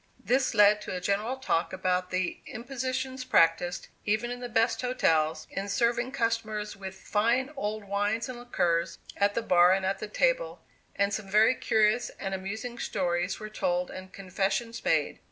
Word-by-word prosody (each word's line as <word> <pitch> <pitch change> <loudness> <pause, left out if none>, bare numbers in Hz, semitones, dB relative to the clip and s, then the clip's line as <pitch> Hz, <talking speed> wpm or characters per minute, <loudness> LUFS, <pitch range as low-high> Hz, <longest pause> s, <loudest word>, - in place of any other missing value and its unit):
This 260 +1 +1
led 210 0 +6
to - - -5
a - - -2
general 210 +7 -1
talk 175 -10 0
about 185 -1 0
the 185 0 -2
impositions 260 +2 -4
practised, 175 -7 +2 0.2
even 215 +3 0
in 245 - -5
the 245 0 -6
best 230 +1 +1
hotels, 160 -11 +1
in 195 +1 -4
serving 240 +4 +1
customers 220 -4 -2
with 190 -1 -8
"fine 235 +8 0
old 215 -4 -3
wines 205 +3 -1
and 255 -2 -7
liquors" 170 -8 0 0.2
at 200 0 +1
the 230 - 0
bar 180 -1 +5
and 190 0 0
at 195 +1 -1
the - - -5
table, - - 0 0.3
and 200 0 +1
some 200 -1 -4
very 215 +4 +5
curious 220 0 +2
and 195 -1 -3
amusing 220 +6 -5
stories 175 0 -1
were 215 - -6
told 180 -4 -1
and 185 0 -9
confessions 195 +5 -2
made. - - +1
210 Hz, 170 wpm, -28 LUFS, 190-240 Hz, 0.3 s, led